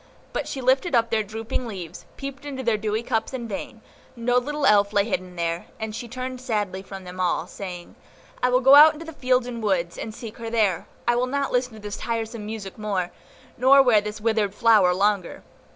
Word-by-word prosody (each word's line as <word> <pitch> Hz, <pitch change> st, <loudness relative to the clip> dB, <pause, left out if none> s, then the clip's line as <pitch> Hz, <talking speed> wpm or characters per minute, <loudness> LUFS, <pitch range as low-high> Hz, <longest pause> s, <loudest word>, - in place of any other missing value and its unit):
But -, -, -2 dB
she 270 Hz, -, -4 dB
lifted 260 Hz, +4 st, +2 dB
up 230 Hz, -1 st, +2 dB
their 220 Hz, -1 st, +2 dB
drooping 220 Hz, +3 st, -4 dB
leaves, 185 Hz, -7 st, -8 dB
peeped 275 Hz, 0 st, -7 dB
into 270 Hz, -2 st, -5 dB
their 230 Hz, -2 st, +2 dB
dewy 215 Hz, +1 st, -2 dB
cups 225 Hz, +1 st, -1 dB
in 240 Hz, -2 st, -5 dB
vain; 220 Hz, +2 st, -6 dB, 0.3 s
no 245 Hz, +1 st, +2 dB
little 295 Hz, +3 st, -2 dB
Elf 205 Hz, -3 st, +4 dB
lay 200 Hz, -1 st, +3 dB
hidden 185 Hz, -4 st, -3 dB
there, 170 Hz, 0 st, -2 dB
and 220 Hz, -1 st, -4 dB
she 240 Hz, -, -6 dB
turned 255 Hz, +1 st, -6 dB
sadly 210 Hz, -6 st, -2 dB
from 195 Hz, 0 st, -9 dB
them 180 Hz, 0 st, -9 dB
all, 180 Hz, -2 st, +1 dB
saying, 180 Hz, -2 st, -8 dB, 0.5 s
"I 250 Hz, -, +3 dB
will 250 Hz, +1 st, +3 dB
go 270 Hz, +1 st, +7 dB
out 300 Hz, +2 st, +10 dB
into 320 Hz, +2 st, -9 dB
the 325 Hz, -, -8 dB
fields 255 Hz, -3 st, +1 dB
and 240 Hz, -2 st, -5 dB
woods, 180 Hz, -5 st, -1 dB
and 225 Hz, -, -5 dB
seek 220 Hz, 0 st, -9 dB
her 230 Hz, -1 st, -5 dB
there. 215 Hz, -7 st, +1 dB, 0.2 s
I 240 Hz, -, +4 dB
will 250 Hz, +1 st, +1 dB
not 280 Hz, +1 st, -1 dB
listen 250 Hz, -1 st, 0 dB
to 220 Hz, -, -11 dB
this 205 Hz, -1 st, -6 dB
tiresome 225 Hz, -2 st, -4 dB
music 215 Hz, -2 st, -7 dB
more, 195 Hz, -4 st, -2 dB, 0.5 s
nor 270 Hz, +2 st, +7 dB
wear 230 Hz, -5 st, +5 dB
this 210 Hz, +1 st, -6 dB
withered 215 Hz, -2 st, 0 dB
flower 215 Hz, -5 st, +5 dB
longer." 195 Hz, 0 st, 0 dB
225 Hz, 215 wpm, -24 LUFS, 200-250 Hz, 0.5 s, out